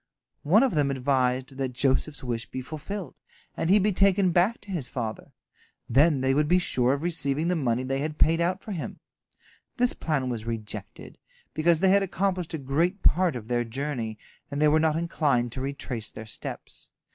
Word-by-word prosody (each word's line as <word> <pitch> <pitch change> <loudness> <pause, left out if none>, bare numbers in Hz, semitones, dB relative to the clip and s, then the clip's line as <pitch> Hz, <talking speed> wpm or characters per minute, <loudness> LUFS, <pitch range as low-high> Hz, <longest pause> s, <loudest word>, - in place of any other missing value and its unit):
One 195 - +4
of 265 - +1
them 145 -3 +2
advised 130 -1 0
that 130 -2 -2
Joseph's 135 +3 0
wish 120 -2 -3
be - - -5
fulfilled, 160 +8 -7 0.4
and 165 - -1
he 200 - +7
be 210 +1 +2
taken 195 -1 +3
back 180 +7 +2
to 205 - -10
his 160 -9 -3
father. 115 -4 -5 0.6
Then 140 +3 +4
they 130 0 +2
would 150 +2 +2
be 180 +3 +4
sure 130 -7 +2
of 140 +2 -3
receiving 160 -2 0
the 180 - +2
money 125 -5 0
they 135 +1 -1
had 150 +1 -3
paid 165 +1 +3
out 185 +3 0
for 215 - -7
him. 175 -5 -5 0.8
This 245 0 +2
plan 150 -5 -1
was 120 -3 -3
rejected, 115 -2 -7 0.3
because 165 +1 +3
they 190 - +5
had 200 +1 +5
accomplished 185 -3 -1
a - - -2
great 160 +8 -1
part 180 -3 +3
of 110 -3 -7
their 120 0 +1
journey, 120 -2 -4 0.3
and 140 0 -4
they 150 - +5
were 155 +1 +4
not 155 -1 +2
inclined 145 -7 0
to 130 - -5
retrace 130 -5 -4
their 110 - -9
steps. 105 - -8
150 Hz, 190 wpm, -26 LUFS, 130-175 Hz, 0.8 s, he